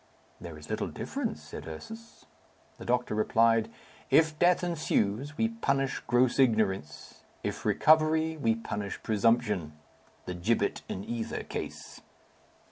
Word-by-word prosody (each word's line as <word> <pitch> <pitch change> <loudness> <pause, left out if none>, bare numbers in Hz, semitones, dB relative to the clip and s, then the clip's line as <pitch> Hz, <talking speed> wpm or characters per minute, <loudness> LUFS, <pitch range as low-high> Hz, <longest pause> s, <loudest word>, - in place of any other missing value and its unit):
"There 85 -3 -8
is 75 0 -12
little - - -2
difference," 75 0 -4
said 75 - -9
Ursus. 225 - -10 0.5
The - - -8
doctor 125 -1 0
replied, 115 +1 +3 0.4
"If 155 -1 +4
death 180 +1 +4
ensues, 145 - 0
we 225 - +2
punish 135 - 0
gross 120 +2 +3
ignorance; 105 - 0 0.2
if - - -4
recovery, 160 +1 +4
we 115 -7 +1
punish 105 -3 -5
presumption. 105 -6 +1 0.5
The 90 - -4
gibbet 95 +7 0
in 95 - -4
either 115 0 -4
case." - - -7
115 Hz, 125 wpm, -29 LUFS, 100-155 Hz, 0.5 s, If